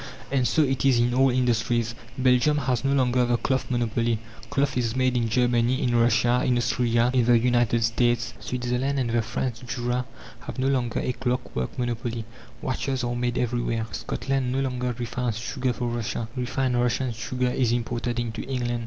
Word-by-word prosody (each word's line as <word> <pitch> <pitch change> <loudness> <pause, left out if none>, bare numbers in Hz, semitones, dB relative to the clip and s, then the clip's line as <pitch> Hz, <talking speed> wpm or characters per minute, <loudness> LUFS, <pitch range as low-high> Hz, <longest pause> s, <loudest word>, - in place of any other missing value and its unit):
And 130 -3 +2
so 155 - +3
it 135 -2 0
is 135 -3 +4
in 120 +1 +2
all 135 +1 +4
industries. 120 -2 +1 0.2
Belgium 130 +3 +3
has 130 -4 0
no 135 - +1
longer 125 -2 +3
the 120 0 +2
cloth 130 +2 -1
monopoly; 115 -1 0 0.3
cloth 140 -1 0
is 120 -2 0
made 130 -1 +2
in 115 -2 +1
Germany, 120 +1 +2
in 120 - +1
Russia, 120 +1 +3
in 125 -2 +2
Austria, 120 0 +2
in 125 -2 +4
the 120 0 +6
United 120 -1 +2
States. 120 +1 +1
Switzerland 125 +2 -1
and 125 -3 0
the 120 0 +2
French 120 +1 -3
Jura 120 +1 -2 0.3
have - - -8
no 130 +1 +1
longer 125 -4 0
a - - -1
clockwork 125 - -3
monopoly; 120 -2 -2 0.4
watches 130 0 -1
are 120 0 -1
made 120 0 -1
everywhere. 120 -2 0
Scotland 135 -2 -2
no 135 +1 0
longer 125 -2 -2
refines 120 -1 -2
sugar 125 +2 -2
for 120 +1 -3
Russia: 120 -1 -3
refined 125 0 0
Russian 125 +1 0
sugar 125 +2 -2
is 125 -2 +1
imported 120 0 -1
into 115 -2 -3
England. 120 -2 -2
120 Hz, 180 wpm, -25 LUFS, 120-130 Hz, 0.4 s, the